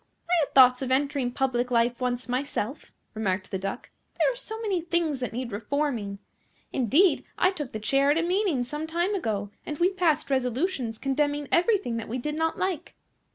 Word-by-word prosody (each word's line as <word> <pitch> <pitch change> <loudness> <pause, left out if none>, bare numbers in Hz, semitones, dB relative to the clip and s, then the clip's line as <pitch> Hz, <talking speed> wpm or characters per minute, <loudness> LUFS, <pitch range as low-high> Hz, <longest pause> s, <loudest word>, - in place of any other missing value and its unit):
"I 350 - 0
had 300 - -1
thoughts 255 -1 +7
of 260 - -2
entering 275 -1 +1
public 250 -1 0
life 240 0 +1
once 250 0 -1
myself," 260 0 -3 0.2
remarked 195 -3 -2
the 190 - -2
Duck; 195 +5 -5 0.3
"there - - +3
are - - -6
so 445 -3 -7
many 400 -6 -1
things 335 -4 0
that 250 - -3
need 245 0 -4
reforming. 225 -2 -2 0.6
Indeed, 280 - +3
I 365 - +4
took 295 -9 -6
the 215 - -4
chair 275 +6 +2
at 295 - +4
a 335 - +2
meeting 355 -7 +1
some 295 +5 -5
time 345 +5 0
ago, 210 - -2
and 295 - -5
we 355 +4 +3
passed 320 -6 +1
resolutions 255 -1 0
condemning 290 +2 0
everything 355 - +2
that 225 - -5
we 245 - -2
did 300 +4 -3
not 320 +1 0
like. 370 -5 -2
275 Hz, 190 wpm, -27 LUFS, 245-330 Hz, 0.6 s, thoughts